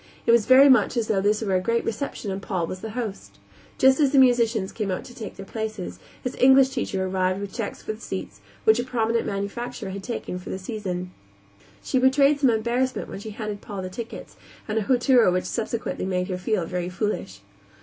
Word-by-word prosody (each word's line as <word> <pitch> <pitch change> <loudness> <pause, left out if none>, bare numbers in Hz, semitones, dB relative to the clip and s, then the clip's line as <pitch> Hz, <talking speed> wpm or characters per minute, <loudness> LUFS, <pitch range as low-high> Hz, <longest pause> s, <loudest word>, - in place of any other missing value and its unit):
It - - +4
was 235 -3 +4
very 265 +2 +8
much 250 -3 +4
as 230 -2 0
though 200 -3 +1
this 210 +2 +1
were 195 -3 -1
a - - +3
great 230 +4 0
reception 225 -3 -3
and 190 +1 -4
Paul 185 -4 -2
were - - -5
the 185 +4 -7
host. 220 -5 -5 0.4
Just 265 +1 +5
as 285 -3 +4
the 285 - +3
musicians 235 -6 +4
came 210 -3 -3
out 185 - -2
to 245 - -11
take 220 -4 -8
their 195 - -9
places, 220 -3 -5 0.2
his 250 - -3
English 265 +1 +6
teacher 190 -7 -2
arrived 185 0 0
with 200 -1 -6
checks 225 -4 -5
for 215 - -3
the 215 - -13
seats 100 - -6 0.2
which 220 +2 +5
a - - 0
prominent 230 -2 0
manufacturer 200 +2 -4
had 195 +1 -6
taken 190 -4 -5
for 180 - -10
the - - -3
season. 185 -3 -4 0.7
She 260 - +1
betrayed 275 +3 +4
some 270 -3 +4
embarrassment 240 +3 0
when - - -6
she 220 - -7
handed 210 -1 -5
Paul 200 -3 -6
the 185 - -4
tickets, 230 +4 -8 0.3
and 220 +1 0
a - - -1
hauteur 245 0 +4
which 180 0 0
subsequently 230 -3 -3
made 180 0 -1
her 185 - -2
feel 185 -2 0
very 180 +1 -3
foolish. 180 - -3
215 Hz, 215 wpm, -24 LUFS, 190-245 Hz, 0.7 s, very